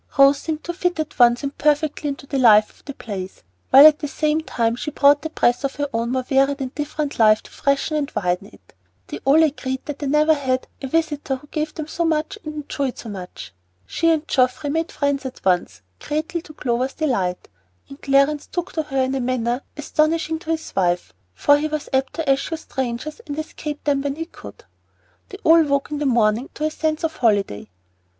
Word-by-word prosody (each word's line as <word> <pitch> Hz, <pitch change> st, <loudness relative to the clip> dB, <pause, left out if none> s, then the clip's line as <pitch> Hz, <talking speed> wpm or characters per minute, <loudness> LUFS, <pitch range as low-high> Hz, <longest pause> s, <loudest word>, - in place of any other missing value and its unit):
Rose 275 Hz, 0 st, +6 dB
seemed 310 Hz, 0 st, -4 dB
to 345 Hz, -, -4 dB
fit 355 Hz, -1 st, -1 dB
at 310 Hz, -3 st, -4 dB
once 240 Hz, +1 st, +5 dB
and 280 Hz, 0 st, -4 dB
perfectly 300 Hz, 0 st, +1 dB
into 275 Hz, -1 st, -5 dB
the 275 Hz, -1 st, -2 dB
life 215 Hz, -4 st, +6 dB
of -, -, -26 dB
the 280 Hz, -, -6 dB
place, 190 Hz, -4 st, -7 dB, 0.3 s
while 275 Hz, +2 st, +9 dB
at 310 Hz, -1 st, +7 dB
the 295 Hz, -, -3 dB
same 305 Hz, +2 st, 0 dB
time 235 Hz, -5 st, -1 dB
she 285 Hz, -, -4 dB
brought 285 Hz, 0 st, +4 dB
the 320 Hz, -, -4 dB
breath 245 Hz, -4 st, +1 dB
of 275 Hz, -, -2 dB
her 290 Hz, 0 st, -2 dB
own 230 Hz, +1 st, -1 dB
more 260 Hz, 0 st, 0 dB
varied 275 Hz, +2 st, +2 dB
and 260 Hz, -1 st, -4 dB
different 295 Hz, -1 st, -4 dB
life 215 Hz, -1 st, +5 dB
to -, -, -16 dB
freshen 280 Hz, +2 st, 0 dB
and 295 Hz, -1 st, -1 dB
widen 180 Hz, +1 st, -1 dB
it. -, -, -21 dB, 0.3 s
They -, -, -7 dB
all 295 Hz, +4 st, +6 dB
agreed 265 Hz, -4 st, -2 dB
that 295 Hz, -2 st, -6 dB
they 290 Hz, -, -3 dB
had -, -, -1 dB
never 305 Hz, +1 st, +4 dB
had 260 Hz, -3 st, -1 dB, 0.2 s
a 270 Hz, -, -4 dB
visitor 295 Hz, -2 st, -1 dB
who 260 Hz, -, -12 dB
gave 305 Hz, -1 st, -3 dB
so 340 Hz, -, -2 dB
much 325 Hz, +5 st, -1 dB
and 305 Hz, -1 st, -6 dB
enjoyed 275 Hz, -3 st, -3 dB
so 230 Hz, -, -8 dB
much. 185 Hz, -, -8 dB, 0.3 s
She 330 Hz, -, 0 dB
and 320 Hz, -1 st, +1 dB
Geoffrey 265 Hz, +3 st, +1 dB
made 325 Hz, +2 st, -1 dB
friends 285 Hz, -1 st, -1 dB
at 260 Hz, -5 st, -8 dB
once, 175 Hz, -, 0 dB, 0.2 s
greatly 320 Hz, +3 st, -3 dB
to 320 Hz, -2 st, -14 dB
Clover's 255 Hz, 0 st, -1 dB
delight, 195 Hz, -, -1 dB, 0.4 s
and 275 Hz, -, -13 dB
Clarence 275 Hz, +2 st, +2 dB
took 350 Hz, +1 st, -4 dB
to 320 Hz, -, 0 dB
her 270 Hz, -3 st, -1 dB
in 260 Hz, +1 st, -1 dB
a 270 Hz, -, -1 dB
manner 245 Hz, 0 st, -1 dB, 0.2 s
astonishing 315 Hz, +2 st, 0 dB
to 325 Hz, -, -11 dB
his 320 Hz, -1 st, -3 dB
wife, 175 Hz, -2 st, 0 dB, 0.2 s
for 290 Hz, -, +4 dB
he 305 Hz, -, -1 dB
was 305 Hz, -1 st, -4 dB
apt 265 Hz, 0 st, +1 dB
to 325 Hz, -3 st, -3 dB
eschew 275 Hz, +4 st, +1 dB
strangers, 265 Hz, -, -5 dB
and 290 Hz, 0 st, -5 dB
escape 300 Hz, -1 st, -6 dB
them 280 Hz, -2 st, +1 dB
when 280 Hz, 0 st, -2 dB
he 325 Hz, +2 st, -4 dB
could. 100 Hz, -, -13 dB, 0.7 s
They -, -, -8 dB
all 330 Hz, +1 st, +7 dB
woke 280 Hz, -1 st, 0 dB
in 295 Hz, -, -3 dB
the 295 Hz, -, 0 dB
morning 230 Hz, 0 st, +2 dB
to 300 Hz, -, -5 dB
a 310 Hz, -, 0 dB
sense 310 Hz, 0 st, -2 dB
of 320 Hz, -1 st, -2 dB
holiday. 200 Hz, -, 0 dB
280 Hz, 215 wpm, -21 LUFS, 255-310 Hz, 0.7 s, while